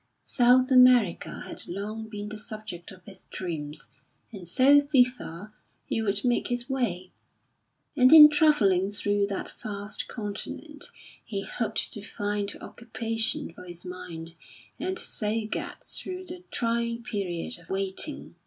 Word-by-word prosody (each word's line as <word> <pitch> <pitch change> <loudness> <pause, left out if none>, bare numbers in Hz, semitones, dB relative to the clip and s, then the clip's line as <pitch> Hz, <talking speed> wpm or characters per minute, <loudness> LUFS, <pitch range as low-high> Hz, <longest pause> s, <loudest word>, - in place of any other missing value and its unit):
South 255 +2 +4
America 250 -7 +5
had - - -8
long 215 +4 -5
been 210 -1 -6
the 215 - -6
subject 215 -5 -8
of 185 -2 -15
his 190 -2 -12
dreams, 155 -5 -5 0.4
and 190 -6 -9
so 270 - +6
thither 250 - 0 0.3
he 225 - -1
would 200 0 -1
make 245 -1 +2
his 245 0 -3
way; 205 -10 -2 0.8
and 255 0 +6
in 310 -2 +12
travelling 260 - +3
through 205 0 0
that 200 -1 -4
vast 205 -1 -5
continent 245 +8 -6 0.4
he 195 -3 -4
hoped 225 0 0
to 210 - -6
find 205 -1 -3
occupation 225 -5 -3
for - - -12
his 175 0 -8
mind 170 -2 -8 0.5
and 370 +4 -2
so 215 -5 -2
get 215 - -5
through 370 0 -5
the 360 0 -8
trying 235 0 -1
period 200 -3 -3
of - - -19
waiting. 195 +10 -2
215 Hz, 135 wpm, -27 LUFS, 195-250 Hz, 0.8 s, in